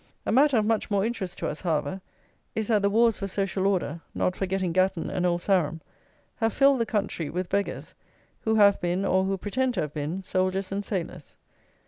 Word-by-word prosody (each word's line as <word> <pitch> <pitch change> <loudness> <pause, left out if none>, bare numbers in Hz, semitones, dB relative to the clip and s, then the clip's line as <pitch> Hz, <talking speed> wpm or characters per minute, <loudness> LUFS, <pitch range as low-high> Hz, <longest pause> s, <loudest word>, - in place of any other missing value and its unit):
A - - 0
matter 270 +2 +5
of 215 - +2
much 220 0 0
more 200 -1 +1
interest 195 -6 -3
to - - -3
us, 150 - -4
however, 160 +1 -1 0.5
is 220 0 -2
that 215 -3 +3
the 200 - +3
wars 230 +1 +3
for 195 - -3
"social 195 0 -1
order," 170 -4 -1
not 180 - 0
forgetting 190 -2 -1
Gatton 185 -1 +1
and 180 -1 0
Old 175 0 0
Sarum, 170 -5 +1 0.6
have 225 -2 0
filled 275 -1 +4
the 230 - 0
country 195 -8 -2
with 180 +1 -3
beggars, 200 +1 -2 0.5
who 220 0 0
have 200 -2 +5
been, 175 +2 0
or 190 0 +2
who 195 0 -1
pretend 250 +6 -1
to 180 - 0
have 150 -1 -4
been, 155 +6 -3
soldiers 185 +1 -1
and 200 +1 -2
sailors. 175 -7 -5
195 Hz, 200 wpm, -26 LUFS, 180-210 Hz, 0.6 s, matter